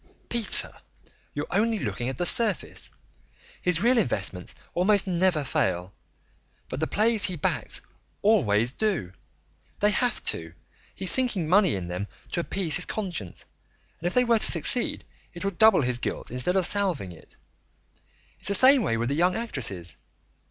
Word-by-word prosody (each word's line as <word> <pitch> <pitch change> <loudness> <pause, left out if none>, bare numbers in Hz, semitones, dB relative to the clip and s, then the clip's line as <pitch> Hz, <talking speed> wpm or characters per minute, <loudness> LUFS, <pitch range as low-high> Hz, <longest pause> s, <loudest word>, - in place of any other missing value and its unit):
"Peter, 235 -3 +4 0.6
you're 145 +1 -3
only 220 +3 +1
looking 125 -10 -4
at 130 - -6
the 175 - -1
surface. 225 +3 +1 0.7
His 180 -1 0
real 245 +1 +4
investments 95 - -2 0.2
almost 200 +3 +2
never 180 -4 0
fail. 90 -7 -2 0.8
But 130 - -5
the 160 - -1
plays 220 0 +2
he 185 - -1
backs 150 - -2 0.4
always 120 - +2
do. 175 - -2 0.7
They 210 +1 +3
have 245 0 0
to; 80 0 -1 0.4
he's 190 0 +2
sinking 240 -11 +1
money 185 - +3
in 95 -2 -5
them 90 +3 -5 0.2
to - - -2
appease 170 -1 -1
his 180 - +1
conscience, 175 - -6 0.5
and 170 - -3
if 175 - -3
they 250 - +4
were 235 -2 +2
to - - +3
succeed 175 +9 +2 0.3
it 175 - -7
would 195 -3 -4
double 220 -8 +5
his 125 -1 +1
guilt - - -5
instead 125 +9 -1
of 190 -2 +2
salving 180 - -1
it. 80 - -16 1.0
It's - - -3
the 200 - +5
same 260 +5 +8
way 115 - -1
with 120 +2 -2
the - - -1
young 180 +3 +1
actresses. 115 - -4
180 Hz, 160 wpm, -25 LUFS, -, 1.0 s, same